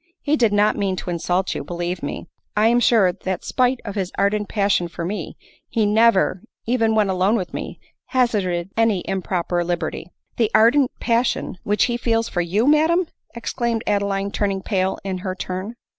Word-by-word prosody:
He 295 - +2
did 235 -7 +3
not 205 +1 +3
mean 195 -2 0
to 180 - -5
insult 180 +2 0
you, - - -4
believe 175 +3 -4
me. 145 - -5 0.3
1 210 +1 +3
am 235 +2 +4
sure, 220 -6 +4
that 185 0 -4
spite 255 0 +1
of 205 - -4
his 195 -3 -3
ardent 205 +1 +1
passion 200 -4 +1
for 170 0 -6
me, 200 +4 -5 0.3
he 225 -3 +1
never, 210 -3 +3 0.2
even 225 -2 +2
when 215 -2 +3
alone 190 +3 +2
with 185 -6 -3
me, - - -6 0.3
hazarded 195 -8 0
any 225 -5 +1
improper 180 -2 -1
liberty." 170 -1 -3
" - - -45
The 225 -3 +2
ardent 245 +5 +5
passion 235 -5 0
which 210 +1 +2
he 240 -1 0
feels 230 -1 0
for 175 - -1
you 190 +7 +1
madam 320 +5 +4 0.2
!" - - -37
exclaimed 235 -1 -2
Adeline, 200 -1 0
turning 195 -2 -1
pale 190 -2 0
in 190 -2 -3
her 185 0 -4
turn. 185 +4 -5
200 Hz, 185 wpm, -21 LUFS, 185-230 Hz, 0.3 s, ardent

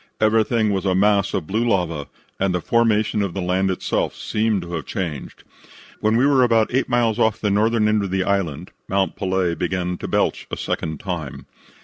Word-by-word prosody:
Everything 110 0 +2
was 95 -2 -1
a 95 -2 +1
mass 100 0 +3
of 90 - -2
blue 110 +7 -1
lava, 90 -10 0 0.3
and 95 -2 +1
the - - +1
formation 110 0 +1
of 100 -3 -2
the - - -2
land 95 +2 +1
itself 95 - -1
seemed 105 -3 -1
to 85 0 -8
have 80 - -4
changed. 85 -9 -5 0.6
When 110 +1 +2
we 125 - +3
were 140 -2 +4
about 115 -2 +3
eight 130 - +1
miles 120 -2 +1
off 110 -2 +2
the 105 - 0
northern 110 +2 +2
end 105 -1 +2
of 100 - -3
the 95 0 0
island 95 -7 -2 0.2
Mount 95 0 0
Pelee 95 -3 0
began 90 0 -2
to - - -5
belch - - 0
a - - -4
second 80 -1 -3
time. 85 -8 -5
100 Hz, 200 wpm, -21 LUFS, 90-110 Hz, 0.6 s, were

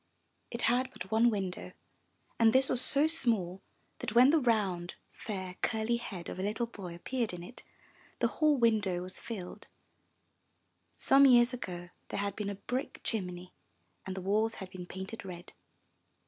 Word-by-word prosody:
It 235 - -4
had 255 +2 +3
but 190 - -8
one 225 +2 +5
window 195 -5 -3 0.7
and 225 -1 +6
this 260 +1 +4
was 250 - +1
so 285 +2 +3
small 225 - +1 0.4
that, 210 - -4
when 255 +4 +8
the 320 - +5
round, 200 -9 0 0.2
fair, 185 -4 -6
curly 225 +1 +1
head 190 -7 -7
of - - -6
a - - -1
little 215 +4 -1
boy 195 -7 -8
appeared 235 +4 -2
in 175 - -8
it, 240 +8 -10 0.6
the - - +1
whole 305 -2 +3
window 210 -7 +2
was 185 0 -9
filled. 195 -6 -7 1.3
Some 275 +1 +6
years 240 -1 +6
ago 175 -7 -6 0.2
there - - -3
had 200 -1 -2
been 210 -2 -3
a 200 - -3
brick 250 +6 -4
chimney 180 -4 -2 0.5
and 190 - -5
the - - -3
walls 215 +4 +1
had 190 -2 -8
been 180 -2 -8
painted 190 +5 -7
red. 180 -2 -9
210 Hz, 165 wpm, -32 LUFS, 185-240 Hz, 1.3 s, when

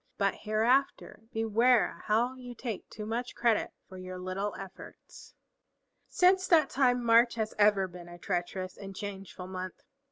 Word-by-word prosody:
But 200 -1 +2
hereafter 225 +3 0
beware 225 +2 +2
how 235 +4 +2
you 250 -2 -10
take 230 -4 -6
too 210 - -7
much 235 +3 -3
credit 235 -3 +2 0.2
for 185 -1 -10
your 185 0 -7
little 185 +3 -3
efforts." 195 -1 -12 0.7
Since 370 +1 +3
that 315 -6 +4
time 250 -2 +2
March 235 +1 +5
has 220 -1 -2
ever 205 -2 +4
been 175 -1 -11
a 175 - -10
treacherous 180 +1 -3
and 195 -1 -9
a - - -12
changeful 195 -3 -7
month. 185 0 -7
215 Hz, 155 wpm, -30 LUFS, 190-245 Hz, 0.7 s, March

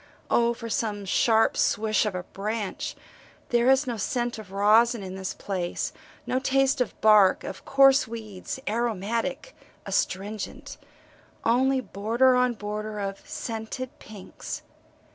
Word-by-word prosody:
O 235 0 +3
for 230 0 -7
some 210 -2 -2
sharp 225 +3 +3
swish 215 0 +2
of 200 - -3
a 180 - -3
branch 205 +2 -4 0.5
there 240 +1 +3
is 265 +2 +4
no 240 -3 -3
scent 240 +2 -2
of 205 -3 -11
resin 215 +3 +4
in 185 -1 -6
this 190 0 -5
place, 180 -3 -3 0.3
no 255 - 0
taste 270 0 +2
of 250 - -2
bark, 210 -3 +6
of - - -7
coarse 270 -1 +5
weeds, 220 -1 -7
aromatic, 230 - -2 0.3
astringent 205 +2 -3 0.7
only 260 +3 +3
border 235 +4 +2
on 250 -1 +3
border 210 0 -5
of 195 -1 -4
scented 230 +3 -5
pinks. 210 -3 -8
220 Hz, 130 wpm, -26 LUFS, 205-245 Hz, 0.7 s, bark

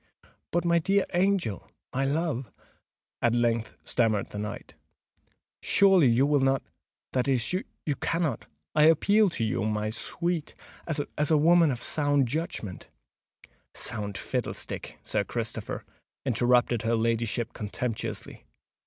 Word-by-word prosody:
"But, 175 +1 0
my 170 0 +4
dear 195 +4 +2
angel—my 175 - -1
love," 140 -3 -1 0.7
at 120 0 +3
length 115 -1 0
stammered 110 -4 +1
the 105 - -5
knight, 105 0 -6 0.9
"surely 190 -7 +5
you 120 +3 +4
will 145 0 +3
not—that 135 -1 -2
is, 130 +2 +1
you 170 -5 -3
cannot—I 150 - -1
appeal 200 +6 +5
to 115 - -2
you, 110 - -1
my 105 0 -1
sweet, 170 +6 -2 0.3
as 150 -1 -1
a 155 - +5
woman 165 +1 +5
of 125 -3 -2
sound 145 -3 +2
judgment——" 115 - -4 0.9
"Sound 105 -3 -3
fiddlestick, - - -4
Sir - - 0
Christopher!" - - -4 0.4
interrupted 120 -1 +3
her 115 +1 +1
ladyship 115 0 0
contemptuously. 110 +2 -4
135 Hz, 115 wpm, -28 LUFS, 115-165 Hz, 0.9 s, surely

